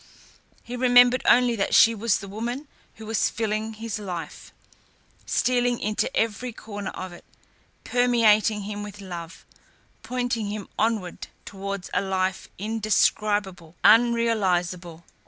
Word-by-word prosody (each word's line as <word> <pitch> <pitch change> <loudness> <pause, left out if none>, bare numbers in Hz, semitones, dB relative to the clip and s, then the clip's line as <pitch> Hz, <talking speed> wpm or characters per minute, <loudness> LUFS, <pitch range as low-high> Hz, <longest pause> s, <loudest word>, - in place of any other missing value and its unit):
He 245 - -7
remembered 245 0 +5
only 245 -1 +4
that 195 - +1
she 230 - +7
was 225 -1 +1
the 200 - -9
woman 240 +8 -5 0.3
who 220 - -11
was 220 0 +1
filling 220 0 -2
his 220 -1 -5
life, 180 -5 -7 0.8
stealing 245 -1 +1
into 215 0 -1
every 230 +3 -1
corner 205 -2 -7
of 185 -1 -7
it, 175 - -13 0.6
permeating 225 -4 +3
him 205 +1 -5
with 205 0 -8
love, 175 -3 -8 0.6
pointing 245 -3 -2
him 210 -1 -6
onwards 215 -5 -1 0.2
towards 195 -1 -6
a - - +2
life 190 -1 -2
indescribable, 205 -4 0
unrealisable.... 190 -7 +2
215 Hz, 120 wpm, -25 LUFS, 195-235 Hz, 0.8 s, she